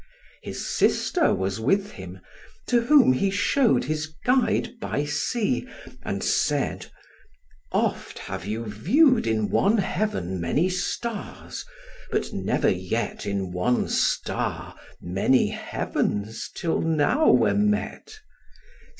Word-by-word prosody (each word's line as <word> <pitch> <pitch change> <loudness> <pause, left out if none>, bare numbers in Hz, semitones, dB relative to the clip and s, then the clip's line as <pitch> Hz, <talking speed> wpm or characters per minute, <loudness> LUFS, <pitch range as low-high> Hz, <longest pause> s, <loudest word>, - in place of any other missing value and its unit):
His - - -6
sister 350 -3 +2
was 95 +2 -2
with 195 - +1
him; 95 -2 -10 0.4
to 240 -1 +2
whom 255 - +5
he 195 +10 +1
show'd 210 +6 +2
His 155 +3 -2 0.2
guide 250 -1 +1
by 145 -7 -2
sea, 150 - -1 0.3
and - - -4
said, - - 0 0.8
"Oft - - -1
have 95 -1 -6
you 110 +4 -4
view'd 230 - +3
In 110 -2 0
one 210 +4 +3
heaven 180 - -1
many 145 - +1
stars, 205 - -4 0.4
but - - -2
never - - +1
yet - - -3
In 100 -2 -2
one 90 +8 0
star - - -1 0.2
many 95 +9 +2
heavens 105 +2 -3
till 165 - -1
now 165 - +2
were - - +4
met. 210 - -1
155 Hz, 115 wpm, -25 LUFS, -, 0.8 s, whom